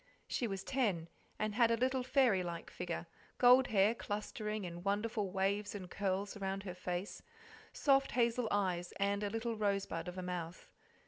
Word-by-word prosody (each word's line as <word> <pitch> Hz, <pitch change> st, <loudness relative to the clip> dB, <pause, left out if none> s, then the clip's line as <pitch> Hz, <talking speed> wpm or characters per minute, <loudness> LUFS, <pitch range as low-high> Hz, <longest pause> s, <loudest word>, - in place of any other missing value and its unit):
She 240 Hz, -, -1 dB
was 195 Hz, -2 st, -4 dB
ten, 200 Hz, -12 st, 0 dB, 0.3 s
and 215 Hz, 0 st, -1 dB
had 235 Hz, +1 st, +4 dB
a 230 Hz, -, +2 dB
little 260 Hz, +2 st, +1 dB
fairy 250 Hz, -6 st, +3 dB
like 170 Hz, -1 st, -5 dB
figure, -, -, -4 dB, 0.3 s
gold 250 Hz, +1 st, +7 dB
hair 205 Hz, +1 st, +4 dB
clustering 210 Hz, -1 st, -4 dB
in 175 Hz, 0 st, -6 dB
wonderful 205 Hz, +1 st, 0 dB
waves 200 Hz, +2 st, 0 dB
and 185 Hz, -3 st, -7 dB
curls 200 Hz, +1 st, -1 dB
around 195 Hz, -1 st, -3 dB
her 185 Hz, -3 st, -5 dB
face, 180 Hz, +1 st, -4 dB, 0.5 s
soft 275 Hz, -1 st, +3 dB
hazel 235 Hz, -1 st, +2 dB
eyes, 180 Hz, -3 st, 0 dB
and 200 Hz, 0 st, 0 dB
a 205 Hz, -, 0 dB
little 225 Hz, +2 st, -2 dB
rosebud 200 Hz, -5 st, -1 dB
of 180 Hz, +1 st, -6 dB
a 185 Hz, -, -3 dB
mouth. 180 Hz, -1 st, -5 dB
205 Hz, 170 wpm, -35 LUFS, 185-230 Hz, 0.5 s, gold